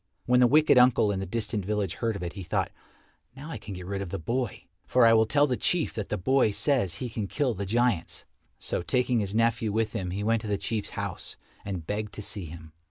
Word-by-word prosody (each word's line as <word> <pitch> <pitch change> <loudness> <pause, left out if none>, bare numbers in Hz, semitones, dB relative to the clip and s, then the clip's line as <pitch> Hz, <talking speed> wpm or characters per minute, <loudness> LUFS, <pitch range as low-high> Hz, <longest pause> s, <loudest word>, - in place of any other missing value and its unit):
When 125 0 +4
the 125 - +6
wicked 150 0 +5
uncle 125 -4 +5
in 95 - -2
the 95 - -4
distant 110 0 -2
village 105 -2 -1
heard 115 -2 -2
of 95 - -5
it, 85 - -4
he 100 - -7
thought, 85 - -1 0.6
"Now 145 +4 -8
I 120 - -5
can 100 -1 -8
get 90 0 -8
rid 100 +1 -3
of 100 - -5
the 100 - -3
boy, 120 +5 -3 0.2
for 125 -2 +5
I 115 - +7
will 110 -1 +4
tell 145 +4 +4
the 130 -3 0
Chief 170 +5 0
that 110 - -4
the 105 - -1
boy 130 +5 +3
says 105 - +1
he 125 - -4
can 110 -3 -4
kill 135 +2 0
the 100 -1 -4
giants." 115 -5 0 0.3
So - - -2
taking 125 +5 +1
his 100 -1 -2
nephew 115 -1 +2
with 110 +1 0
him 90 -2 -3
he 100 +3 -3
went 115 +1 +2
to 110 - -6
the 105 -1 0
Chief's 110 +1 -3
house - - -5 0.3
and 95 -5 -5
begged 105 +3 -3
to 105 - -7
see 100 -2 -5
him. 80 0 -11
110 Hz, 245 wpm, -27 LUFS, 100-125 Hz, 0.6 s, I